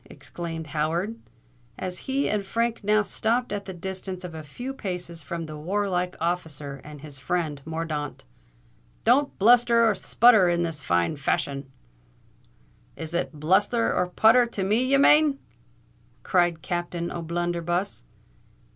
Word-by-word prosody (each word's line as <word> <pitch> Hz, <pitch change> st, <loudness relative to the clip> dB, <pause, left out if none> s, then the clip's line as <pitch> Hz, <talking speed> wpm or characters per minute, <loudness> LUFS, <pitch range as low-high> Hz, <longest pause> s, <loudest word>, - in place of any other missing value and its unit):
exclaimed 165 Hz, +4 st, -7 dB
Howard, 160 Hz, +8 st, -1 dB, 0.6 s
as 180 Hz, -1 st, -5 dB
he 275 Hz, +1 st, +1 dB
and 210 Hz, -1 st, 0 dB
Frank 230 Hz, +3 st, -1 dB
now 210 Hz, +1 st, +3 dB
stopped 235 Hz, +3 st, -1 dB
at 200 Hz, -1 st, -4 dB
the 190 Hz, -, -6 dB
distance 190 Hz, 0 st, -5 dB
of 180 Hz, -2 st, -7 dB
a 160 Hz, -, -6 dB
few 245 Hz, -, -7 dB
paces 180 Hz, -7 st, -5 dB
from 165 Hz, +3 st, -5 dB
the 155 Hz, -1 st, -8 dB
warlike 180 Hz, +2 st, -1 dB
officer 155 Hz, -5 st, -3 dB
and 150 Hz, -1 st, -11 dB
his 145 Hz, -3 st, -9 dB
friend 150 Hz, +1 st, -2 dB
Mordaunt: 160 Hz, -2 st, -4 dB, 0.8 s
"don't 275 Hz, +5 st, +3 dB
bluster 235 Hz, +2 st, +5 dB
and 210 Hz, -, +1 dB
sputter 220 Hz, -3 st, +5 dB
in 175 Hz, 0 st, +1 dB
this 165 Hz, -3 st, -3 dB
fine 85 Hz, -, +1 dB
fashion——" 140 Hz, -1 st, -2 dB, 1.3 s
"Is 160 Hz, 0 st, -7 dB
it 160 Hz, -3 st, -2 dB
blusther 205 Hz, +9 st, +2 dB
and 180 Hz, 0 st, +1 dB
sputther 235 Hz, +2 st, +5 dB
to 195 Hz, -, -2 dB
me 215 Hz, +6 st, +2 dB
ye 275 Hz, +2 st, +4 dB
mane!" 295 Hz, 0 st, +5 dB, 0.9 s
cried 175 Hz, -3 st, +1 dB
Captain 175 Hz, -1 st, -3 dB
O'Blunderbuss. 175 Hz, -, -2 dB
175 Hz, 140 wpm, -25 LUFS, 160-210 Hz, 1.3 s, bluster